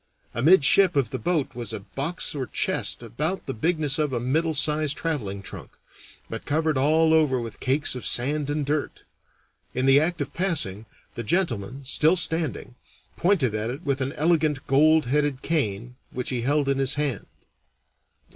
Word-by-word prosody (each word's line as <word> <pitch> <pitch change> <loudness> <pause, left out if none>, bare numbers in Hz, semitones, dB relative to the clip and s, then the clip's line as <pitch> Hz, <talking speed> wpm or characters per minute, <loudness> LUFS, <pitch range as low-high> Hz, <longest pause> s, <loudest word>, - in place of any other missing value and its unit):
Amidship 175 - +4
of 135 -6 +1
the 130 - -3
boat 155 +3 -1
was 120 -2 -6
a 110 -2 -5
box 145 - -2
or 135 -4 -4
chest - - -1
about 150 - -3
the 135 - -4
bigness 155 +2 0
of 150 -2 0
a 120 - 0
middle 155 +6 0
sized 150 0 +2
traveling 105 -12 -3
trunk, - - -10 0.5
but 115 - -6
covered 155 +1 0
all 160 +4 +3
over 150 -5 +3
with 115 -2 -7
cakes 135 +3 +2
of 125 - -6
sand 145 +4 0
and 145 0 -1
dirt. 150 +1 -3 0.7
In 130 +1 0
the 135 +1 +6
act 170 +3 -1
of 145 -1 -4
passing, 125 - -2 0.3
the - - -5
gentleman, 135 - -1
still 155 +5 +3
standing, 160 -7 0 0.4
pointed 170 - +1
at 110 +1 -2
it 135 +7 -6
with 140 -1 -1
an 135 +2 -2
elegant 155 -3 +1
gold 155 +2 +4
headed 145 +1 0
cane 125 -6 -2
which 125 +1 -4
he 125 -2 -2
held 145 +3 +1
in 135 0 +1
his 135 -1 +1
hand. 145 -7 -2
145 Hz, 170 wpm, -24 LUFS, 125-155 Hz, 0.7 s, the